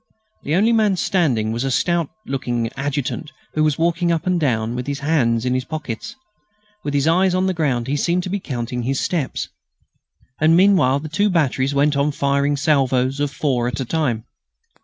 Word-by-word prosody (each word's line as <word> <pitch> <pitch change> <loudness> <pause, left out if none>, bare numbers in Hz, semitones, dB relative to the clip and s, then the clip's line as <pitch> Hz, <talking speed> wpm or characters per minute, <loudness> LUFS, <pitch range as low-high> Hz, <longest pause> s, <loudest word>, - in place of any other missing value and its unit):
The 150 - -1
only 220 +5 +3
man 210 -4 +3
standing 130 - +1
was 115 +2 -2
a 135 - -1
stout 170 +3 +1 0.2
looking 120 -4 -2
adjutant 145 +2 -3 0.2
who 155 - +1
was 155 -2 +2
walking 170 +1 +1
up 165 -2 -1
and 180 -1 +1
down 115 -6 0
with 125 +1 -4
his 140 0 -3
hands 125 -6 +1
in 125 - +1
his 130 0 0
pockets. 145 - -6 0.7
With 145 -1 -2
his 140 +2 +2
eyes 180 +2 +3
on 185 +1 +1
the 190 - +1
ground 135 -8 0
he 140 - -1
seemed 175 +5 0
to 185 - -4
be 200 +2 -1
counting 125 -6 -4
his 130 +3 -1
steps. 160 -7 -2 0.9
And 160 +2 +5
meanwhile, 180 -9 +4
the 155 - -7
two 200 +7 +1
batteries 140 -5 +1
went 145 +1 +3
on 140 +1 +1
firing 140 0 +1
salvoes 135 -2 +1
of 145 0 0
four 130 -4 -1
at 120 - -3
a 130 - -2
time. 125 -6 -1
145 Hz, 195 wpm, -20 LUFS, 130-165 Hz, 0.9 s, And